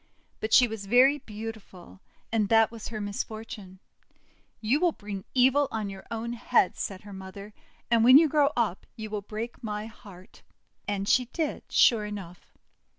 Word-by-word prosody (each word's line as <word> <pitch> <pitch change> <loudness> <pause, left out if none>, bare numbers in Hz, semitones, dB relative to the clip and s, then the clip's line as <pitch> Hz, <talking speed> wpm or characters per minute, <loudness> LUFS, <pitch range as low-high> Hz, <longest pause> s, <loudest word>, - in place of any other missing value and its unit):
But 220 - -4
she 250 +2 +7
was 215 -3 -7
very 260 +6 +5
beautiful, 210 - -9 0.3
and 215 -3 +1
that 225 -1 +4
was 230 -2 -8
her 220 -2 -5
misfortune. 205 -1 -6 0.8
"You 235 +7 +1
will 350 -1 +2
bring 200 -2 -7
evil 265 +3 +4
on 215 -3 -3
your 190 -1 -11
own 230 +1 -4
head," 240 -4 +2
said 190 -2 -5
her 205 -1 -10
mother, 190 +2 -10 0.4
;<and 230 -1 +4
when 255 +3 +9
you 320 +1 +6
grow 295 -1 +3
up 215 -6 -1
you 215 -1 -7
will 210 -1 -3
break 220 +4 -7
my 210 -1 -4
heart!' 200 -4 -14 0.5
And 200 -1 -2
she 250 +3 +3
did, 305 +5 -3
sure 215 -3 +4
enough. 190 -4 -9
220 Hz, 165 wpm, -27 LUFS, 200-240 Hz, 0.8 s, when